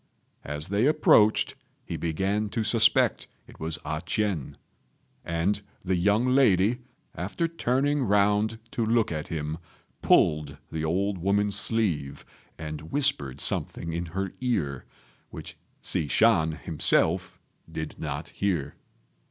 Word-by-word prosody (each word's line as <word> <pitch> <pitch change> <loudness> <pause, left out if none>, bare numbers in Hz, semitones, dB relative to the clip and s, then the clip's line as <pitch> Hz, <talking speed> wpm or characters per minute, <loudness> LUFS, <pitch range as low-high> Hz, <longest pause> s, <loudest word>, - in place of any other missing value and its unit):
As 75 +3 -4
they 105 +6 +2
approached 115 -8 +4 0.3
he - - -5
began 95 +6 -1
to 110 - -2
suspect 110 +1 +3 0.2
it - - -17
was 80 +1 -2
A 80 0 -3
ch'ien; 90 - -2 0.7
and 85 +5 -1 0.2
the 95 0 +1
young 105 +6 +2
lady, 125 -4 +3 0.3
after 100 - -2
turning 145 -2 0
round 105 0 +2
to 115 - -1
look 115 -2 +1
at 75 -1 -4
him, 80 0 -4 0.4
pulled 75 -2 +2
the 80 -1 -3
old 95 +4 -1
woman's 100 +3 +1
sleeve, 80 -12 0 0.3
and 75 0 -7
whispered 130 - +2
something 80 +3 -1
in 85 +1 -3
her 95 +3 -4
ear, 80 - -1 0.4
which - - -9 0.3
Hsi 75 - 0
Shan 80 -5 +3
himself 85 +3 +1 0.3
did 80 -1 -6
not - - -5
hear. 85 -8 -2
95 Hz, 125 wpm, -26 LUFS, 80-110 Hz, 0.7 s, approached